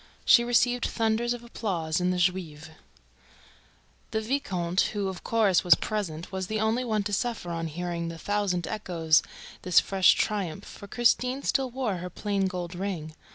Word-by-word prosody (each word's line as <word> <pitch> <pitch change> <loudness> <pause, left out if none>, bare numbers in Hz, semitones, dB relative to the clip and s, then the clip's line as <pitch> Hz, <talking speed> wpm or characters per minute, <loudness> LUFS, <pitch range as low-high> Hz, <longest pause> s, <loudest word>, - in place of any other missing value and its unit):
She 235 - +7
received 245 0 +2
thunders 225 +1 0
of 240 -1 -4
applause 180 -8 -2
in 180 - +1
the 180 - 0
Juive. 170 -4 -1 1.4
The 220 - -1
viscount, 200 -8 -1 0.2
who, 200 -1 0
of 185 -2 -8
course, 215 -6 +2
was 175 -3 +7
present, 175 -7 -4
was 190 -1 -3
the 215 +1 -2
only 220 +3 +1
one 215 -4 0
to 205 0 -4
suffer 225 -5 -2
on 165 -1 -3
hearing 170 +1 -4
the 165 0 -6
thousand 195 -1 -1
echoes 170 -7 +2
of - - -10 0.3
this 180 - +5
fresh 190 -2 +4
triumph; 195 -4 -2
for 200 - -11
Christine 250 +4 +1
still 265 -2 +1
wore 240 -6 -2
her 180 +1 -6
plain 200 +1 -1
gold 180 -1 -5
ring. 175 -4 -4
195 Hz, 170 wpm, -27 LUFS, 175-225 Hz, 1.4 s, She